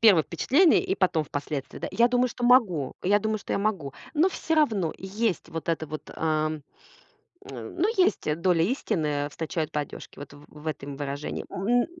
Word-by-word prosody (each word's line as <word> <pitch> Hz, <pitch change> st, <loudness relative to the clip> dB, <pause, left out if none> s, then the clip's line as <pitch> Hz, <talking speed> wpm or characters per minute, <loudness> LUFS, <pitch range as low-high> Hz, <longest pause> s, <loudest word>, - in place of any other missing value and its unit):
Первое 200 Hz, -8 st, +7 dB
впечатление 290 Hz, -, +4 dB
и 190 Hz, -, -1 dB
потом 180 Hz, -5 st, +2 dB
впоследствии, 145 Hz, -2 st, -5 dB
да. -, -, -4 dB
Я 235 Hz, +1 st, +4 dB
думаю, 250 Hz, +1 st, +2 dB
что 240 Hz, +1 st, -5 dB
могу. 210 Hz, -, +4 dB
Я 205 Hz, +3 st, +4 dB
думаю, 220 Hz, +1 st, -1 dB
что -, -, -5 dB
я -, -, +1 dB
могу. 195 Hz, -10 st, -1 dB, 0.2 s
Ну, 320 Hz, +5 st, +4 dB
всё 325 Hz, -3 st, -2 dB
равно. 220 Hz, -, +2 dB
Есть, 195 Hz, -2 st, -2 dB
вот 165 Hz, 0 st, -6 dB
эта 160 Hz, -1 st, 0 dB
вот, 155 Hz, 0 st, -7 dB
эм, 155 Hz, -1 st, 0 dB, 0.8 s
н -, -, -8 dB
ну 360 Hz, +4 st, +2 dB
есть, 365 Hz, -, +2 dB
доля 175 Hz, -2 st, +3 dB
истины. 155 Hz, -, 0 dB
Встречают 160 Hz, 0 st, -3 dB
по 150 Hz, -, 0 dB
одежке. 145 Hz, -, -9 dB
Вот 145 Hz, 0 st, -9 dB
в 145 Hz, +1 st, -14 dB
в 150 Hz, +1 st, -14 dB
этом 140 Hz, -2 st, -4 dB
выражении. 145 Hz, 0 st, -4 dB
М. 240 Hz, +6 st, +2 dB
175 Hz, 185 wpm, -26 LUFS, 150-230 Hz, 0.8 s, Первое